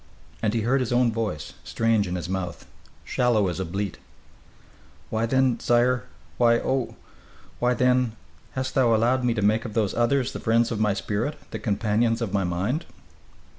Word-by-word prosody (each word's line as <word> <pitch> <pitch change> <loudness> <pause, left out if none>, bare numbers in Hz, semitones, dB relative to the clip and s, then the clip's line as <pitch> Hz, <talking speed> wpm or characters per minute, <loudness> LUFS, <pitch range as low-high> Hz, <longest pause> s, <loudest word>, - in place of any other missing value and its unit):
And 110 0 0
he 115 - +1
heard 125 +5 +2
his 125 -3 -2
own 120 -1 +3
voice, 110 -10 -3
strange 115 -3 +1
in 90 - -3
his 85 -1 -4
mouth, 90 -2 -4 0.4
shallow 110 -6 +2
as 90 - -4
a 95 - -1
bleat: 100 +2 -4 1.1
"Why, 110 +1 0
then, 130 -1 +2
sire 120 -1 +2 0.3
why, 115 -1 +5
oh! 130 +1 -1 0.6
why, 125 0 +2
then, 125 -1 +2 0.4
hast 130 0 -3
thou 120 -4 +4
allowed 125 +4 +2
me 120 -2 +1
to 105 - -1
make 110 +2 +3
of 110 -3 -7
those 105 -4 +1
others 120 +2 +1
the - - -5
friends 115 +1 +2
of 110 - -2
my 105 -2 +2
spirit, 110 +8 -2
the - - -4
companions 110 +2 +1
of 115 -5 -3
my 100 -1 +2
mind?" 95 - -1
115 Hz, 175 wpm, -25 LUFS, 105-125 Hz, 1.1 s, why